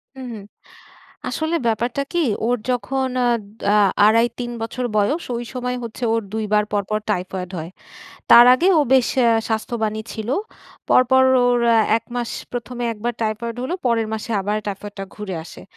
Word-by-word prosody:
হু, 265 - -9
হু। 220 - -7 0.9
আসলে 315 +2 -1
ব্যাপারটা 240 +4 0
কী? 345 -1 +2 0.2
ওর 245 +1 +2
যখন 260 +2 -1 0.2
আদ 235 -3 +1 0.3
আ - - +4 0.3
২.৫, 230 +2 +5
৩ 240 -1 -3
বছর 245 +3 -3
বয়স, 280 +12 +1
ওই 240 - -4
সময়ে 250 0 -3
হচ্ছে 235 +2 -7
ওর 230 - +1
২ 220 0 -1
বার 210 0 +4
পরপর 205 +1 0
টাইফয়েড 185 -1 -3
হয়। 160 +1 -5 0.6
তার 235 - +10
আগে 345 +8 +2
ও - - +5
বেশ 260 -2 +4
অ্যা 235 -2 +4 0.2
স্বাস্থ্যবানই 220 -1 -2
ছিল। 220 0 -6 0.6
পরপর 260 +1 +5 0.2
ওর 245 0 +3
অ্যা 230 - +5 0.2
১ 230 - -25
মাস 240 -1 -2 0.2
প্রথমে 245 0 -4
একবার 230 +2 -3
টাইফয়েড 225 +2 -2
হলো, 260 +7 -2
পরের 230 -2 +1
মাসে 220 +1 -5
আবার 205 +2 -1
টাইফয়েডটা 200 0 -6
ঘুরে 210 -3 -6
আসে। - - -12
230 Hz, 165 wpm, -21 LUFS, 215-250 Hz, 0.9 s, তার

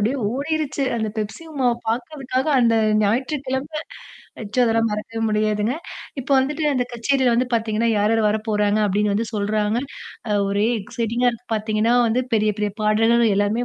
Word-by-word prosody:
அப்டியே 235 +7 +1
ஓடிருச்சு. 290 +1 -2
அந்த 220 -1 -1
பெப்சி 215 +9 -4
உமாவ 255 -4 +1
பாக்கிறதுக்காக 255 +3 -2
அந்த 230 -1 +3 0.3
ஞாயிற்றுக்கிழமை 265 +6 -1 0.6
நிச்சயம் 220 +4 +1
அதெல்லாம் 225 0 +2
மறக்க 220 +2 -5
முடியாதுங்க. 215 +2 0 0.5
இப்ப 270 +2 -10
வந்துட்டு, 295 +4 -1
அந்தக் 250 -1 -1
கச்சேரி 260 +3 +1
வந்து 245 +2 +2
பாத்தீங்கன்னா, 225 0 0
யார் 210 +2 +2
யாரு 225 - +2
வரப்போறாங்க? 210 -1 0
அப்டின்னு 205 +1 +1
வந்து 225 +2 0
சொல்றாங்க. 210 +1 0 0.5
அ 210 - 0 0.2
ஒரே 200 +2 +1
எக்சைட்டிங்கா 235 +4 -1
இருக்கு. 240 +1 -11
பார்த்தீங்கன்னா, 215 +1 +1
வந்து 240 +3 +1
பெரிய 215 -1 +2
பெரிய 210 0 0
பாடகர்கள் 225 +1 +3
எல்லாமே 205 +4 +1
225 Hz, 150 wpm, -22 LUFS, 215-255 Hz, 0.6 s, அந்த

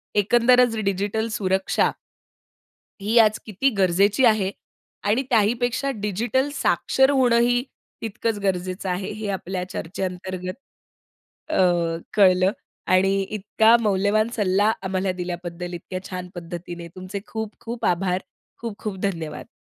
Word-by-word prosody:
एकंदरचं 235 +2 +4
digital 200 +3 -1
सुरक्षा 190 -2 +1 1.1
ही 215 +4 +1
आज 215 -1 +5
किती 220 +6 +1
गरजेची 195 +6 +3
आहे? 215 -4 +3 0.6
आणि 220 +5 +3
त्याही 220 -3 +4
पेक्षा 245 +3 0
डिजिटल 225 +7 0
साक्षर 265 -2 +2
होणंही 245 -2 +3 0.4
तितकचं 225 -1 -2
गरजेचं 185 0 -1
आहे 185 +3 -2
हे 215 - -4
आपल्या 185 -1 -3
चर्चेअंतर्गत, 185 +1 -4 1.0
अ, - - 0 0.6
कळलं 190 -2 +5 0.4
आणि 195 +1 +3
इतका 215 +2 +3
मौल्यवान 210 +1 +2
सल्ला 205 0 +3
आम्हाला 190 0 0
दिल्याबद्दल 175 0 -5
इतक्या 185 +2 -5
छान 180 -2 -5
पद्धतीने 170 0 -7
तुमचे 185 +2 -6
खूप, 220 -1 -4
खूप 230 0 -5
आभार. 180 +1 +1 0.4
खूप, 230 -3 -5
खूप 210 -3 -4
धन्यवाद. 165 -4 -6
200 Hz, 115 wpm, -23 LUFS, 185-220 Hz, 1.1 s, आज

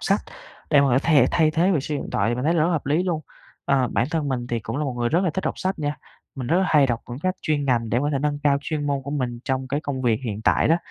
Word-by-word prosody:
sách - - +1 0.5
để 145 - +6
mà 140 - +3
có 130 +1 +4
thể 145 -6 +5
thay 160 -2 +3
thế 170 +5 +2
việc 145 -6 +1
sử 150 - -3
dụng 140 - -2
điện - - -8
thoại, 115 +1 +1
mình 125 +3 -3
thấy 165 - +2
là 170 - +1
rất 155 - +3
là 180 - +1
hợp 150 -4 -2
lý 150 +5 +2
luôn. 175 -4 -1 0.4
Ờ, 130 -3 +2
bản 120 - 0
thân 160 -4 -1
mình 125 -2 -2
thì 120 -2 -2
cũng 115 +3 -5
là 150 - -1
một 135 - -2
người 120 -1 0
rất 170 +6 +2
là 175 - +1
thích 190 +5 -4
đọc - - -2
sách 190 -1 -2
nha. 145 -1 -2 0.4
Mình 130 -3 -5
rất 170 - +2
là 190 - +2
hay 145 -3 +5
đọc 120 -2 -1
quyển 120 +2 -7
sách 185 0 0
chuyên 150 -2 0
ngành 120 -4 +1
để 120 - +2
có 145 +2 0
thể 135 - +1
nâng 145 0 -1
cao 140 -1 +3
chuyên 145 0 -3
môn 140 -1 -1
của 140 - -6
mình 125 -5 -2
trong 130 0 -2
cái 140 +2 -1
công 140 -3 -4
việc 115 -2 +1
hiện 105 -1 -4
tại - - +3
đó. 165 - +5
140 Hz, 330 wpm, -23 LUFS, 125-155 Hz, 0.5 s, để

